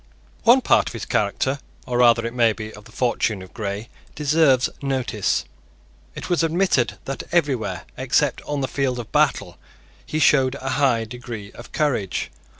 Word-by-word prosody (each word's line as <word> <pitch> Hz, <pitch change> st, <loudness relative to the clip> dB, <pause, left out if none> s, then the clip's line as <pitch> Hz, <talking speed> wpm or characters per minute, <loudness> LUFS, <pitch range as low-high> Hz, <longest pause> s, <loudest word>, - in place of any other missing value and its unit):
One 245 Hz, +3 st, +7 dB
part -, -, +3 dB
of -, -, -5 dB
the -, -, -5 dB
character, 130 Hz, +7 st, 0 dB, 0.3 s
or 125 Hz, -1 st, -1 dB
rather, 120 Hz, -1 st, +5 dB
it 115 Hz, -, -3 dB
may 115 Hz, -3 st, +3 dB
be, 110 Hz, 0 st, -7 dB
of 105 Hz, 0 st, -13 dB
the 115 Hz, -, -15 dB
fortune, 115 Hz, -5 st, 0 dB
of 95 Hz, -, -14 dB
Grey 105 Hz, +1 st, -4 dB, 0.3 s
deserves 150 Hz, -3 st, +3 dB
notice. 130 Hz, -7 st, -1 dB, 0.7 s
It -, -, -6 dB
was 175 Hz, -1 st, +1 dB
admitted 160 Hz, -, +1 dB
that 135 Hz, -, -4 dB
everywhere, 145 Hz, -9 st, 0 dB
except -, -, +1 dB
on 145 Hz, -1 st, -2 dB
the 135 Hz, -, 0 dB
field 130 Hz, 0 st, -1 dB
of 120 Hz, -3 st, -7 dB
battle, -, -, +1 dB, 0.4 s
he 155 Hz, -, -4 dB
showed 135 Hz, -4 st, +4 dB
a 135 Hz, -1 st, -5 dB
high 130 Hz, -5 st, +2 dB
degree 110 Hz, -3 st, -8 dB
of 120 Hz, -, -12 dB
courage. 125 Hz, -11 st, -1 dB
125 Hz, 165 wpm, -22 LUFS, 110-140 Hz, 0.7 s, One